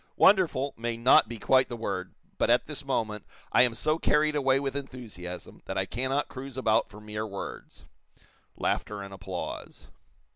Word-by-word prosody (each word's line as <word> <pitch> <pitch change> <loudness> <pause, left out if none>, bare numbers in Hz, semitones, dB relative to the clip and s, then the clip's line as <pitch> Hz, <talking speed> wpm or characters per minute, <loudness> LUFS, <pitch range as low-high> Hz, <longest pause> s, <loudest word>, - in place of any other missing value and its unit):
'Wonderful' 170 -8 +4
may 115 0 -2
not 115 -2 +6
be 120 - -5
quite 130 +4 +3
the 120 - -5
word, 95 -5 -4 0.2
but, - - +2
at - - +4
this - - -6
moment, 105 -2 -1 0.3
I - - +6
am 120 -2 +4
so 155 +6 +1
carried 150 0 +3
away 135 -2 +3
with 135 -1 -3
enthusiasm 110 -11 -7
that - - -4
I - - +1
cannot 130 +4 -1
cruise 135 0 -8
about 110 -4 +2
for 105 +1 -12
mere 105 0 -4
words." 100 -2 -8 0.7
(Laughter 105 -1 -1
and 100 0 -9
applause.) 95 -2 -6
120 Hz, 170 wpm, -28 LUFS, 105-135 Hz, 0.7 s, not